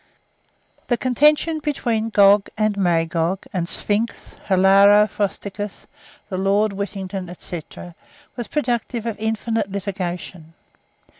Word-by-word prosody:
_ - - -39
The 240 - +1
contention 300 +6 +2
between 235 -7 -1
Gog 200 -1 +5
and 215 -1 +1
Magog, 170 -1 0
and 175 -2 -2
Sphinx, 215 +3 -1
Hilaro 195 +2 +6
Frosticos, 205 0 -4 0.4
the 185 -3 -4
Lord 200 +2 +2
Whittington, 195 -2 -5
&c., 175 -2 -4 0.7
was 240 -3 -5
productive 240 -4 -2
of 225 -2 -4
infinite 220 -1 -2
litigation. 180 -4 -5
205 Hz, 105 wpm, -21 LUFS, 190-225 Hz, 0.7 s, Hilaro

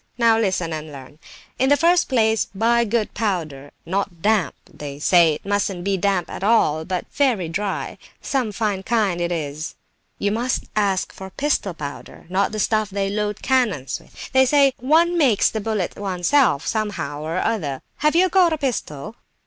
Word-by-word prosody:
Now 230 -2 +4
listen 185 -6 0
and 155 0 -6
learn; 140 +2 -12 0.4
in 265 +1 +3
the 285 - +5
first 345 +2 +3
place 220 -4 +2
buy 235 +3 +3
good 225 0 -1
powder, 160 -10 -3 0.2
not 185 -2 -3
damp 210 -6 +2
(they 140 -1 -8
say 165 +1 +4
it - - -12
mustn't 200 -3 -1
be 195 -1 -1
at 190 -2 -1
all 210 -8 +3
damp, - - -14
but 185 -1 -2
very 245 - +2
dry), 195 +4 -3 0.2
some 255 -6 -1
fine 205 -2 -1
kind 200 -5 0
it 170 0 -1
is—you 155 +5 -5
must 240 +4 -1
ask 200 -3 0
for 190 0 -9
pistol 210 - -1
powder, 145 -2 -8
not 190 +2 +1
the 215 - -5
stuff 215 0 +1
they 195 0 -2
load 210 0 -2
cannons 220 - 0
with. - - -12
They 265 0 +4
say 275 -1 +4
one 335 +6 +3
makes 250 -10 +3
the 220 - -3
bullets 210 -4 -2
oneself, 190 - +1
somehow 170 -10 -3
or 160 +3 -3
other. 165 -11 -2
Have 300 +2 +1
you 365 +2 +5
got 360 -3 +4
a - - -1
pistol?" 220 - -4
205 Hz, 175 wpm, -22 LUFS, 175-235 Hz, 0.4 s, the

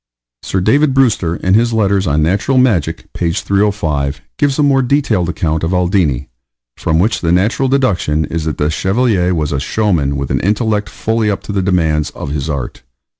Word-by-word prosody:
Sir 95 - -2
David 140 +7 +2
Brewster, 110 -11 +2
in 95 +2 0
his 115 +2 +3
Letters 100 -3 +1
on 75 +1 +1
Natural 100 - +1
Magic, 120 - 0
page 85 -1 -1
305, 95 -9 -1 0.2
gives 145 -2 +1
a 150 - +2
more 135 -2 +3
detailed 120 - +1
account 80 -2 -1
of 85 +3 -1
Aldini, 90 -7 +1 0.5
from 80 - 0
which 105 +6 +1
the 85 - 0
natural 105 +9 +1
deduction 90 - +1
is 80 +2 -4
that 80 - -3
the 75 +1 0
Chevalier 95 -1 +1
was 75 -2 -1
a 70 - -1
showman 80 -5 0
with 70 -1 -3
an - - +1
intellect 105 +1 0
fully 110 -1 -1
up 100 - -2
to - - -6
the 100 -1 0
demands 80 -5 +1
of 70 - -6
his 75 +1 -3
art. 70 -5 -4
95 Hz, 185 wpm, -15 LUFS, 80-110 Hz, 0.5 s, his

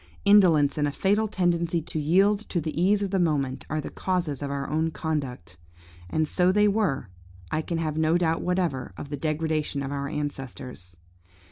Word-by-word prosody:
indolence 165 -9 +5
and 145 - +2
a - - -1
fatal 205 +8 +1
tendency 170 -3 +1
to 160 0 -4
yield 195 +7 +3
to 175 - 0
the 160 +1 -3
ease 200 +3 +3
of 195 - -3
the 195 - +1
moment, 140 -6 0
are 155 - -1
the 150 - -5
causes 175 -7 -2
of 140 - -3
our 140 0 -3
own 160 +2 0
conduct; 145 - -4 0.5
and 155 - 0
so 180 +3 +2
they 210 +2 +4
were, 195 - 0 0.4
I 155 - +1
can 170 +1 -3
have 155 -1 -2
no 160 +2 +3
doubt 165 -2 +1
whatever, 170 - -1
of 145 - -7
the 145 - -3
degradation 155 -2 -1
of 135 - -4
our 140 0 -3
ancestors. 130 - -6
160 Hz, 190 wpm, -26 LUFS, 145-180 Hz, 0.5 s, indolence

